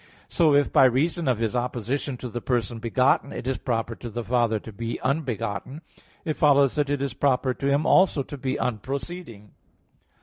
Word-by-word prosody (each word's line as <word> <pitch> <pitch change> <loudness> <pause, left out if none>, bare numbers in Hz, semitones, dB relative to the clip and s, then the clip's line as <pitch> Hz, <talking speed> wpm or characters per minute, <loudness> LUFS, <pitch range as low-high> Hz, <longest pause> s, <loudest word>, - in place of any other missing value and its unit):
So 155 -4 +3
if 145 -1 +2
by - - +7
reason 150 +6 +1
of 125 -3 +2
his 115 +1 -1
opposition 125 +2 -2
to 125 - -6
the 120 0 -5
person 120 -2 -1
begotten, 125 +4 +1
it - - -6
is 130 0 -1
proper 115 -2 -2
to 120 - -7
the 120 +2 -4
Father 120 -2 +1
to 110 - -9
be 115 +3 -4
unbegotten 130 - -2 0.4
it 155 -2 -2
follows 140 -3 +4
that 145 -2 0
it 145 -1 -1
is 140 - -2
proper 130 -2 +1
to 135 - -3
Him 140 +2 +2
also 180 -6 +4
to 145 - -8
be 130 -1 -2
unproceeding. 125 - -5
130 Hz, 190 wpm, -25 LUFS, 115-140 Hz, 0.4 s, by